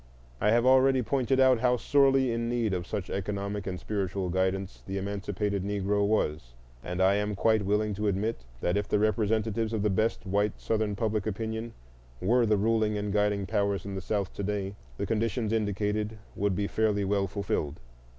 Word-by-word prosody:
I 105 - +3
have 120 +2 +3
already 130 0 +5
pointed 130 +1 +1
out 130 -2 +5
how 125 +1 +3
sorely 135 -1 +3
in 115 0 -1
need 120 -4 0
of 90 -1 -3
such 100 -3 -4
economic 100 0 -3
and 90 -1 -3
spiritual 95 -1 -2
guidance 95 +1 -1
the 95 0 -3
emancipated 100 0 -2
Negro 100 0 0
was, 75 - -1 0.3
and 90 +1 -4
I 95 +1 +5
am 105 0 -1
quite 110 +1 +2
willing 105 +1 +1
to 105 +2 -2
admit 100 - -1 0.2
that 90 +3 +1
if 105 0 -1
the - - +2
representatives 110 +1 +1
of 105 -2 -1
the 105 - +2
best 110 +3 0
white 100 +2 0
Southern 110 -2 -1
public 110 -1 -1
opinion 110 +2 -3 0.5
were 115 - +3
the 105 -1 +3
ruling 110 0 +1
and 105 -1 -2
guiding 105 -1 +1
powers 100 -1 0
in 100 - -5
the 95 - -4
South 100 0 -2
to - - -5
day 100 -1 -2 0.2
the - - -2
conditions 115 +1 -1
indicated 105 0 -1 0.2
would 100 -1 0
be 100 - 0
fairly 105 -1 +1
well 100 0 +1
fulfilled. 90 -6 -2
105 Hz, 185 wpm, -28 LUFS, 100-110 Hz, 0.5 s, already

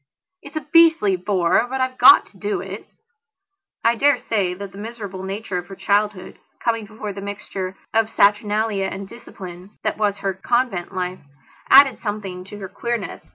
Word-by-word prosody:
It's 375 - -13
a 310 - -3
beastly 325 - +6
bore, 180 +3 +1
but 265 +1 -3
I've 255 0 -1
got 380 - +8
to - - -20
do 410 -2 -2
it." - - -8 1.0
I 230 - +4
dare 280 +5 +3
say 195 -5 -1
that 200 +1 -8
the 195 - -11
miserable 205 -4 -7
nature 195 -1 -4
of 175 - -10
her 195 - -9
childhood, 205 -1 -1 0.2
coming 225 -3 -1
before 215 -1 -6
the 195 - -7
mixture 195 -2 -6 0.2
of 225 -1 +2
saturnalia 205 -1 +2
and 190 0 -6
discipline 190 -3 -11
that - - -2
was 205 -2 +1
her 195 - +1
convent 200 -2 -1
life, 185 0 -3 0.5
added 275 0 +7
something 200 -4 -5
to 205 +2 -10
her 195 -2 -6
queernesses. 235 +1 -5
205 Hz, 170 wpm, -21 LUFS, 190-230 Hz, 1.0 s, got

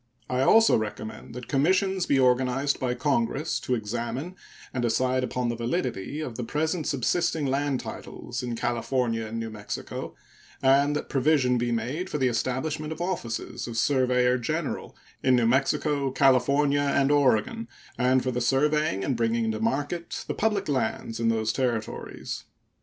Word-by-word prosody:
I 125 0 +1
also 225 +11 +6
recommend 110 +2 -6
that 125 -1 -7
commissions 185 +6 +2
be 140 - +3
organized 130 +2 +2
by 125 -1 -1
Congress 135 +2 0
to 125 - -1
examine 120 - -4 0.4
and 130 - -1
decide 130 +2 +1
upon 125 -1 -1
the 120 - -1
validity 120 - -2
of 125 -7 -5
the 125 - -3
present 155 +6 -1
subsisting 150 +4 0
land 135 0 0
titles 120 +1 -6
in 120 -2 -3
California 120 -1 -1
and 115 +1 -4
New 115 -1 -4
Mexico, 105 -1 -6 0.4
and 140 +2 +4
that 150 - -3
provision 130 -3 +2
be 120 0 0
made 130 +11 -2
for - - -2
the 130 -3 +2
establishment 145 +6 -2
of 160 - -5
offices 170 -15 -3
of 115 -1 -5
surveyor 125 -1 +3
general 155 +5 -3 0.3
in 130 -1 +4
New 120 -2 +3
Mexico, 140 +3 +1
California, 140 +2 +3
and 140 0 +2
Oregon 120 -5 +2 0.3
and 125 +1 +2
for 130 - 0
the 125 0 -2
surveying 135 -4 +2
and 130 - 0
bringing 115 0 +1
into 110 -1 -1
market 145 +9 -2
the - - -1
public 210 -2 0
lands 115 -4 -1
in 115 0 +2
those 110 -1 +1
Territories. 120 -5 -3
130 Hz, 160 wpm, -26 LUFS, 120-145 Hz, 0.4 s, also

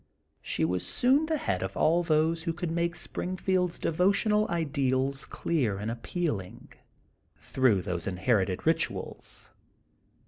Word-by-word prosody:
She - - -1
was 90 +2 -1
soon 275 +5 +2
the 315 -1 +1
head 95 - -1
of 95 +1 -4
all 170 +3 +4
those 160 0 +2
who 165 0 -2
conld 175 -1 -3
make 170 0 0
Springfield's 185 -1 -1
de - - -1
votional 210 +5 +2
ideals 140 -5 0
clear 130 -12 -1
and 105 +3 -3
appealing, 115 - -4 0.7
through 120 -8 +2
those 90 -2 -3
inherited 95 0 0
rituals. 165 +1 -2
155 Hz, 130 wpm, -29 LUFS, 105-175 Hz, 0.7 s, all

